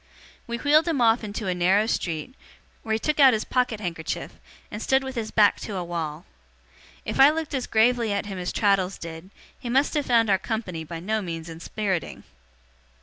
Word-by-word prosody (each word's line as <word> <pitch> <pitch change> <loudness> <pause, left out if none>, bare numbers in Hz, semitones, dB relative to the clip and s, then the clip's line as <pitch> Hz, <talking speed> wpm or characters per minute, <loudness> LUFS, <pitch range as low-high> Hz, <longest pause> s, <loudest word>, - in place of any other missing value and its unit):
We 235 0 -3
wheeled 300 +5 +3
him 320 -5 0
off 230 0 +3
into 210 0 -5
a 185 - 0
narrow 185 +4 +3
street, 170 -1 -3 0.5
where 220 - -2
he - - +2
took 300 +6 -1
out 270 -3 +8
his 220 - 0
pocket 250 -4 0
handkerchief, 170 -5 -4 0.4
and 210 - -6
stood 265 +2 +2
with 265 0 -5
his 225 -3 -3
back 210 -2 +4
to 210 - -6
a 180 - -2
wall. 165 -2 -5 0.8
If 215 - -3
I 270 +2 +9
looked 315 -1 -3
as 260 -3 -2
gravely 230 0 +2
at 200 0 -1
him 195 -2 -6
as 180 0 -3
Traddles 195 -2 +1
did, 165 +2 -9 0.3
he 240 - -6
must 270 +4 +2
have 295 -3 -1
found 230 -3 +3
our 190 - +3
company 190 -6 -4
by 165 +1 -7
no 215 +4 -1
means 165 -3 -6
inspiriting. 180 +3 -4
215 Hz, 200 wpm, -25 LUFS, 180-245 Hz, 0.8 s, I